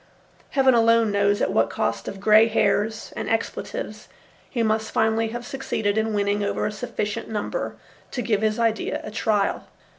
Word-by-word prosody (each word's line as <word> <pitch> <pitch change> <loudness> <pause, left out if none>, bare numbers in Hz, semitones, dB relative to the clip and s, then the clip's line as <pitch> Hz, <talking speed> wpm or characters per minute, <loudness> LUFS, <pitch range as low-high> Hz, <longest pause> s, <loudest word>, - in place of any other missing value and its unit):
Heaven 265 -2 +4
alone 230 -1 +4
knows 200 0 +2
at - - +1
what - - +2
cost - - -2
of 195 - -6
grey 215 +2 +6
hairs 215 0 0
and - - -4
expletives 225 - -3 0.4
he 235 -4 -1
must 220 0 0
finally 220 0 +1
have 240 +2 -6
succeeded 220 -6 -2
in 220 0 0
winning 205 0 +1
over 200 - -1
a - - -1
sufficient 210 +2 -4
number 220 - -3 0.3
to 245 - -3
give 215 -3 +1
his 215 -1 +1
idea 225 -2 0
a - - -7
trial. 210 -2 0
220 Hz, 170 wpm, -24 LUFS, 205-230 Hz, 0.4 s, grey